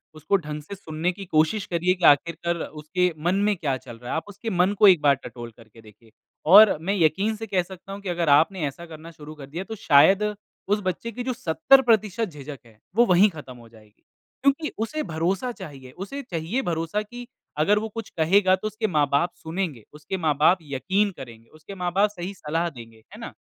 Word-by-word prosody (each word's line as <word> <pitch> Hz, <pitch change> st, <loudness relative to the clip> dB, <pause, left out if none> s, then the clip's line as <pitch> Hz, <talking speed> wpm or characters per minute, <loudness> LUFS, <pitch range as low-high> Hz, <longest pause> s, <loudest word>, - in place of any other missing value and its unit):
उसको 155 Hz, +6 st, 0 dB
ढंग 150 Hz, -3 st, -6 dB
से 200 Hz, -, -8 dB
सुनने 165 Hz, -1 st, -3 dB
की 195 Hz, +2 st, -9 dB
कोशिश 160 Hz, +5 st, +1 dB
करिए 175 Hz, +1 st, +1 dB
कि 180 Hz, -2 st, -2 dB
आख़िरकर 170 Hz, +3 st, +3 dB
उसके 175 Hz, +4 st, -2 dB
मन 180 Hz, +2 st, +2 dB
में 205 Hz, +1 st, +1 dB
क्या 145 Hz, -6 st, -2 dB
चल 120 Hz, -2 st, -12 dB
रहा 120 Hz, +1 st, -8 dB
है? -, -, -1 dB
आप -, -, -3 dB
उसके 205 Hz, +3 st, -7 dB
मन 185 Hz, 0 st, +2 dB
को 210 Hz, -, +8 dB
1 180 Hz, -5 st, +6 dB
बार 140 Hz, -1 st, +4 dB
टटोल 120 Hz, -3 st, -10 dB
करके 115 Hz, -1 st, -17 dB
देखिए। 110 Hz, +1 st, -19 dB, 0.4 s
और 200 Hz, +3 st, +8 dB
मैं 195 Hz, +5 st, -1 dB
यकीन 195 Hz, +5 st, +1 dB
से 225 Hz, +1 st, -7 dB
कह 190 Hz, -3 st, +1 dB
सकता 190 Hz, +1 st, -12 dB
हूँ 200 Hz, -, -8 dB
कि 195 Hz, -, -5 dB
अगर 170 Hz, -2 st, -1 dB
आपने 160 Hz, +4 st, +3 dB
ऐसा 170 Hz, +5 st, -8 dB
करना 165 Hz, 0 st, -11 dB
शुरू 155 Hz, -1 st, -11 dB
कर 145 Hz, -, -10 dB
दिया 170 Hz, +6 st, -5 dB
तो 220 Hz, +3 st, -7 dB
शायद 190 Hz, +3 st, +5 dB, 0.5 s
उस 210 Hz, -, +2 dB
बच्चे 185 Hz, +5 st, -3 dB
की 245 Hz, +3 st, -6 dB
जो 255 Hz, 0 st, -2 dB
70% 225 Hz, 0 st, +3 dB
झिझक 145 Hz, -3 st, -9 dB
है, 110 Hz, -2 st, -21 dB, 0.2 s
वो 240 Hz, +2 st, +5 dB
वही 190 Hz, +1 st, +5 dB
खत्म 150 Hz, -7 st, -11 dB
हो 115 Hz, -1 st, -16 dB
जाएगी। 110 Hz, -2 st, -21 dB, 0.4 s
क्योंकि 280 Hz, +3 st, +1 dB
उसे 305 Hz, +8 st, -3 dB
भरोसा 180 Hz, -, -2 dB
चाहिए, 135 Hz, -, -11 dB
उसे 200 Hz, -, -7 dB
चाहिए 175 Hz, +4 st, -3 dB
भरोसा 165 Hz, +1 st, -2 dB
कि 240 Hz, +3 st, -10 dB, 0.3 s
अगर 200 Hz, +8 st, +3 dB
वो 220 Hz, +1 st, -5 dB
कुछ 225 Hz, +1 st, -7 dB
कहेगा 185 Hz, +4 st, +4 dB
तो 190 Hz, +3 st, -5 dB
उसके 215 Hz, +1 st, -2 dB
माँ-बाप 150 Hz, 0 st, +1 dB
सुनेंगे, 160 Hz, -, -4 dB
उसके 150 Hz, +5 st, -6 dB
माँ-बाप 155 Hz, +1 st, +3 dB
यक़ीन 190 Hz, +9 st, -1 dB
करेंगे, 115 Hz, -4 st, -12 dB
उसके 155 Hz, +6 st, -12 dB
माँ-बाप 185 Hz, +3 st, +1 dB
सही 185 Hz, -1 st, -7 dB
सलाह 165 Hz, -1 st, -2 dB
देंगे, 115 Hz, -6 st, -13 dB, 0.2 s
है -, -, -10 dB
ना? -, -, -8 dB
175 Hz, 205 wpm, -24 LUFS, 150-200 Hz, 0.5 s, को